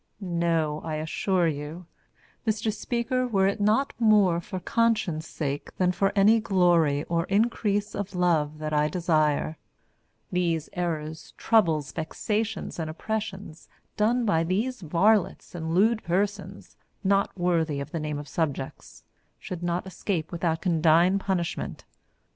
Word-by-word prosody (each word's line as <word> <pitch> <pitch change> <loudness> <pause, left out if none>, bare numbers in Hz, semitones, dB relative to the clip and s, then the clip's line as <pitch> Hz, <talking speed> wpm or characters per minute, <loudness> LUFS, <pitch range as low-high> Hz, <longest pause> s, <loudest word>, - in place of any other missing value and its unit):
No, 170 -5 0
I 160 -1 -3
assure 170 +3 0
you, 155 +3 -5 0.6
Mr 215 0 0
Speaker, 240 +3 -1
were 195 -5 +2
it 200 +2 0
not 220 +7 +2
more 205 -7 +4
for 185 +2 -6
conscience' 210 -7 0
sake 145 -2 -4
than 180 -1 +3
for 195 +2 +1
any 210 +3 +5
glory 175 -8 +3
or 165 0 -1
increase 205 0 0
of 200 -1 -5
love 160 -4 +1
that 155 0 -4
I 150 0 +3
desire, 155 -2 +1 0.7
these 170 -3 0
errors, 160 -3 -4
troubles, 165 -10 +2
vexations 210 +6 -3
and 160 -1 -2
oppressions 200 -1 -5 0.3
done 235 +3 +2
by 165 -6 +2
these 215 +9 -1
varlets 190 +5 +1
and 165 -1 -3
lewd 220 +4 +3
persons 195 +4 -2 0.3
not 195 0 +1
worthy 165 -5 +1
of 140 - -6
the 165 - -3
name 150 -1 -3
of 145 0 -7
subjects 145 -4 -4 0.3
should 180 -2 -7
not 175 +1 -1
escape 185 -3 -3
without 170 -1 -1
condign 170 +2 +4
punishment. 185 -4 -3
175 Hz, 135 wpm, -26 LUFS, 160-205 Hz, 0.7 s, any